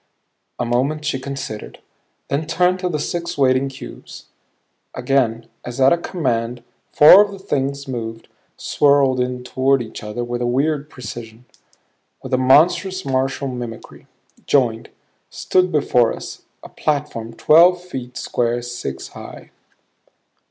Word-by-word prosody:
A - - -2
moment 135 +6 -1
she 140 -3 -1
considered; 135 -5 -6 0.5
then 150 +3 -2
turned 180 +2 +2
to 180 -1 -1
the 155 - -1
six 170 +3 -4
waiting 130 0 +2
cubes. 135 - -11 0.7
Again 120 -4 0 0.2
as 120 +2 -7
at 135 +3 +6
a - - +2
command 120 -9 -2 0.3
four 170 +7 +9
of 205 - -5
the 200 - -9
things 140 -7 -3
moved, 115 -3 -6 0.3
swirled 140 -3 +2
in 125 0 -2
toward 135 +2 +1
each 115 -3 -7
other 105 +3 -5
with 120 0 -4
a 120 - 0
weird 145 +4 0
precision, 120 -3 -9 0.8
with - - -7
a 130 - +3
monstrous 175 +8 +3
martial 135 +1 -1
mimicry; 120 -3 -8 0.4
joined; 120 -5 +1 0.4
stood 185 -1 +1
before 125 -6 +2
us, - - -10 0.2
a - - -10
platform 140 -7 -3
twelve 175 +7 +5
feet 130 -9 -8
square, 120 0 -1
six 120 - -6
high. - - -11
130 Hz, 135 wpm, -20 LUFS, 120-150 Hz, 0.8 s, four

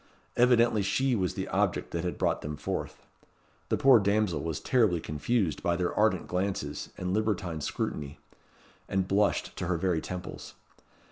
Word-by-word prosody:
Evidently 120 -3 +4
she 125 +6 +1
was 95 -5 -1
the - - -3
object - - 0
that 85 -1 -2
had 90 - -3
brought - - 0
them 75 0 -5
forth. 75 - -5 0.6
The - - +2
poor 135 -3 +7
damsel 100 -2 +1
was 80 -2 -3
terribly 110 -10 +2
confused 80 +4 -1
by 85 - +1
their 90 0 -1
ardent 105 -5 +2
glances 90 -6 -2
and 90 0 -2
libertine 100 -7 -1
scrutiny, 70 0 -3 0.7
and 95 -1 0
blushed 100 +2 +1
to - - -3
her 90 -2 +1
very 85 -2 0
temples. 90 -1 -7
95 Hz, 155 wpm, -29 LUFS, 85-110 Hz, 0.7 s, poor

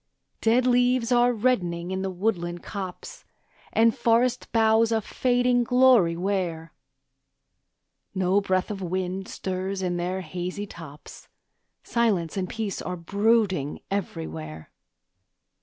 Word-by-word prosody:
Dead 235 +3 +3
leaves 245 -1 +2
are 245 0 +4
reddening 185 -8 0
in 190 0 -2
the 195 - -2
woodland 175 -3 -2
copse, 190 -3 -7 0.5
And 225 0 +3
forest 235 +2 +1
boughs 225 0 +3
a 225 - +2
fading 245 +2 +1
glory 245 -9 +4
wear; 175 -4 -2 1.4
No 190 +2 +2
breath 185 0 0
of 200 -2 -5
wind 185 +1 -3
stirs 190 +1 -4
in 175 -1 -1
their 180 +2 -2
hazy 180 +4 -5
tops, 155 -6 -12 0.6
Silence 210 -9 0
and 185 -2 -2
peace 220 -3 -4
are 180 0 -4
brooding 200 -4 +1
everywhere. 80 - -5
195 Hz, 115 wpm, -25 LUFS, 175-230 Hz, 1.4 s, are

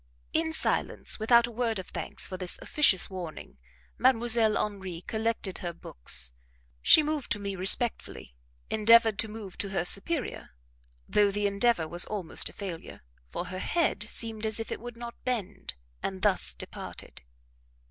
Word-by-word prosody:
In 320 0 +1
silence, 320 - -1
without 235 +2 +5
a 240 - -8
word 230 -1 -1
of 185 - -7
thanks - - -4
for 185 - -5
this 185 -1 +3
officious 210 -11 +4
warning, 170 - -8 0.4
Mdlle. 235 -3 +3
Henri 190 -5 -4
collected 220 -2 -3
her 175 -1 -4
books; - - 0 0.5
she 310 - +7
moved 300 -5 -3
to - - -4
me 200 -1 -4
respectfully, 190 - 0 0.4
endeavoured 225 0 +5
to 225 - +2
move 210 -3 -9
to 200 - -1
her 185 -3 -1
superior, 230 - 0 0.5
though 205 -1 +3
the 205 +1 -1
endeavour 200 -3 +2
was 175 +2 +2
almost 195 -6 0
a - - -15
failure, 185 -5 -7 0.3
for - - -4
her 185 0 -5
head 335 - 0
seemed 225 -2 +1
as 220 0 +1
if 225 - -5
it - - -3
would 240 0 -9
not 235 0 -9
bend, 215 - -3 0.3
and 190 -1 -4
thus 185 - +1
departed. - - -8
210 Hz, 160 wpm, -28 LUFS, 185-235 Hz, 0.5 s, she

